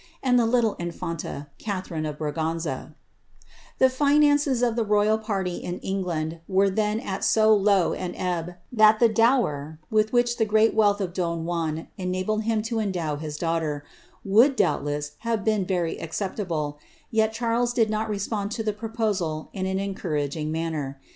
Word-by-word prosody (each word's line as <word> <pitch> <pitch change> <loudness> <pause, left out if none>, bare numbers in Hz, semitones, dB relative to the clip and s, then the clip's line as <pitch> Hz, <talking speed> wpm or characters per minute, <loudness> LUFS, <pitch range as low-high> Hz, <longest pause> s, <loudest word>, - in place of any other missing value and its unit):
and 250 -2 +4
the 230 - +3
little 230 -3 +2
infanta, 170 -4 -5
Catharine 185 -6 -3
of 150 -1 -5
Bra 150 -1 -3 1.5
finances 290 -1 +3
of 235 -2 +2
the 235 - +1
royal 210 +1 +2
party 195 -5 -2
in 175 +1 -5
England 170 -4 -2
were 195 0 +3
then 210 +2 0
at 195 -3 -4
so 220 0 +5
low 200 -4 +3
an 180 -1 -4
t 175 -1 -2 0.2
the 220 0 +6
dower 210 - +2
with 215 0 +2
which 240 0 +2
the 220 - +2
great 215 +1 +3
wealth 205 -2 +3
of 180 -3 -3
don 170 -3 -2
Juan 165 -2 -2
enabled 185 +4 -1
mdow 210 -9 -1
his 150 -1 -5
daughter, 160 -3 -1 0.4
would, 230 +8 +5
doubtless, 145 - 0
have 230 -3 -2
been 215 -3 +2
very 175 -3 -1
acceptable, 165 -4 -3 0.3
'les 230 +2 +1
did 225 -3 +2
not 215 +1 -1
respond 205 0 -2
to 225 - -3
the 215 -1 0
proposal 210 -8 -2
in 190 -2 -2
an 190 0 -1
encouraging 155 -6 -2
manner.' 155 -4 -3
200 Hz, 145 wpm, -25 LUFS, 165-220 Hz, 1.5 s, the